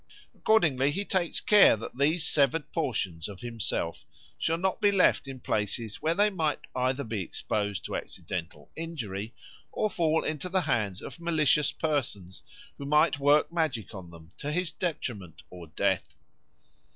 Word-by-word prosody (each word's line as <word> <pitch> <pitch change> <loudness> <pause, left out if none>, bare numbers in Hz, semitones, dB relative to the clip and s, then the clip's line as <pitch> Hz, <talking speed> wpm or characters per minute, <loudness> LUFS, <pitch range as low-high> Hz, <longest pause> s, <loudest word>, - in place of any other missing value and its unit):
Accordingly 150 -11 +3
he 200 +8 -2
takes 180 -4 +1
care 205 - +6
that 115 - -8
these 150 +5 +2
severed 145 +1 +1
portions 105 - -2
of 100 -2 -10
himself 115 -8 -2 0.3
shall 165 - 0
not 190 +2 -1
be 205 - +5
left 180 -7 +3
in 135 -1 -7
places 105 -1 -1
where 160 +2 +1
they 210 +2 +4
might 160 -6 -1
either 130 +2 0
be 110 -4 -3
exposed 100 +2 -2
to - - -4
accidental 85 -5 -6
injury 115 - -5 0.4
or 215 - -1
fall 160 -2 +1
into 155 +3 -3
the 185 0 +2
hands 110 - -1
of - - -8
malicious 155 -3 +3
persons 120 - -3 0.4
who 140 - -6
might 150 0 +3
work 145 +4 +3
magic 155 - -1
on 95 -4 -9
them 85 -1 -14
to 150 - -3
his 180 +1 0
detriment 100 - -4
or 90 -2 -10
death. 80 - -1
140 Hz, 155 wpm, -28 LUFS, 105-165 Hz, 0.4 s, care